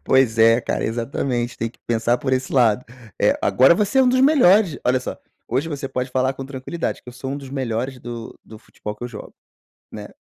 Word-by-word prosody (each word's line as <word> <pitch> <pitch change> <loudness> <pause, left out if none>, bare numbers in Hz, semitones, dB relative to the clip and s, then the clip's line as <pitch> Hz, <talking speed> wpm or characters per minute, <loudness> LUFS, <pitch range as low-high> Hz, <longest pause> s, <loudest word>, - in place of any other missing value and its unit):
Pois 130 -4 +3
é 115 +2 +6
cara, - - -2
exatamente. 120 +1 -2
Tem 115 0 -2
que - - -28
pensar 120 +1 +1
por 130 0 -2
esse 130 0 -1
lado. 120 -3 +3 0.4
Eh, - - +3
agora 135 +6 +5
você 210 +7 +1
é - - +7
um 255 - +4
dos 255 +1 +3
melhores. 215 - +5
Olha 125 +1 +3
só, - - -6 0.3
hoje 135 +7 -1
você 140 -3 -4
pode 125 0 -3
falar 130 +1 0
com 135 - -7
tranquilidade 140 +5 -4
que: - - -15
"Eu - - -8
sou 130 +2 -6
um 140 - -3
dos 135 -2 -9
melhores 130 -1 -3
do 120 -1 -8
do 110 - -12
futebol 105 0 -8
que 120 - -7
eu - - -4
jogo". 110 -4 -10 0.6
Né? - - -8
130 Hz, 225 wpm, -21 LUFS, 120-140 Hz, 0.6 s, é